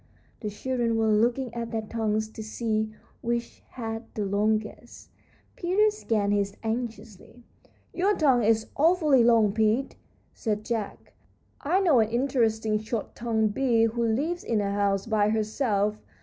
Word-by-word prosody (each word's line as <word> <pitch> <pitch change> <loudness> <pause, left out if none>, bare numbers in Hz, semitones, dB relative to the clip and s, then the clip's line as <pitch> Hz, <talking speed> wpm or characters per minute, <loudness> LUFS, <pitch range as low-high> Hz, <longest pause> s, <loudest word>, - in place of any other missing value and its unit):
The 210 - -4
children 235 +2 -1
were 220 -1 +2
looking 235 +3 +1
at 235 -1 -4
their 225 -1 -3
tongues 215 -1 -1
to 220 - -9
see 220 0 -2 0.3
which 235 0 -3
had 225 -2 -5
the 210 - -1
longest. 215 +3 -2 0.4
Peter 395 +5 +2
scanned 215 - 0
his 200 -1 -1
anxiously. 225 0 -5 0.5
"Your 395 +3 +2
tongue 265 -6 +3
is 220 0 +2
awfully 305 -5 +4
long, 225 -4 +4
Pete," 220 +4 +1 0.4
said 210 -2 -3
Jack. 225 -4 -4 0.5
"I 360 +7 +1
know 320 -10 +4
an 220 -1 +2
interesting 225 -4 +1
short 220 +1 -4
tongued 220 -3 0
bee 240 -3 +2
who 230 +1 0
lives 285 +10 -1
in 225 -2 0
a 200 -1 -1
house 200 -1 0
by 215 -2 +2
herself. 215 -1 0
225 Hz, 145 wpm, -26 LUFS, 215-245 Hz, 0.5 s, awfully